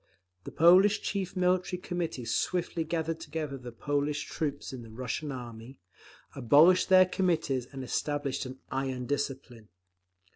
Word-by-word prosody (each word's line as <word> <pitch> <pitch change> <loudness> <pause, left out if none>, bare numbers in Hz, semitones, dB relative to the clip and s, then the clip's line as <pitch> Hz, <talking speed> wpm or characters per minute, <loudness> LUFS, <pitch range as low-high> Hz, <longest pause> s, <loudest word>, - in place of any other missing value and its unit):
The - - -7
Polish 185 +6 +5
Chief 195 -2 -3
Military 180 0 +1
Committee 170 -9 -4
swiftly 165 +8 -1
gathered 160 0 -2
together 155 -4 -5
the 125 -2 -9
Polish 145 +4 -2
troops 145 -3 -4
in 130 - -7
the 115 - -11
Russian 125 +6 -4
army, 120 0 -9 0.6
abolished 155 +10 +5
their 185 0 +7
Committees 170 -9 0
and 135 -2 -6
established 145 0 -2
an 130 +1 -9
iron 130 -2 -2
discipline…. 135 -5 -4
145 Hz, 135 wpm, -29 LUFS, 130-175 Hz, 0.6 s, their